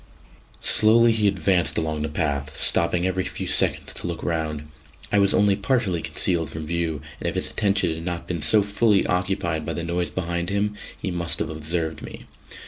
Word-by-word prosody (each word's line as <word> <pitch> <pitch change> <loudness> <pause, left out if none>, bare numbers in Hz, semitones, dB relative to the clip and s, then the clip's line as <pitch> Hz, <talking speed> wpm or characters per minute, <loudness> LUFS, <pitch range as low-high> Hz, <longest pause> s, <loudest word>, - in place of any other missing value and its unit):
Slowly 115 +2 +5
he 110 -2 +2
advanced 90 -5 +2
along 80 -1 -1
the 75 - -2
path, 70 -2 -2
stopping 90 0 +2
every 95 0 0
few - - -5
seconds - - +1
to - - -5
look 85 -1 -5
round. 80 -3 -2 0.5
I 100 - +3
was 100 0 +3
only 100 -1 +3
partially 100 -5 0
concealed 85 -1 +1
from 80 0 -6
view, 80 -3 -2 0.2
and - - -1
if - - -6
his - - -2
attention 100 -5 +1
had 80 +1 -7
not 85 -1 -4
been 85 -3 -3
so 105 +6 +5
fully 105 0 +2
occupied 90 -3 -1
by - - -3
the 85 - -4
noise 85 +1 -2
behind 85 -1 -3
him, 100 +1 0 0.3
he 95 - -3
must 85 -1 -1
have - - -3
observed 80 +1 -3
me. - - -9
85 Hz, 190 wpm, -23 LUFS, 80-100 Hz, 0.5 s, Slowly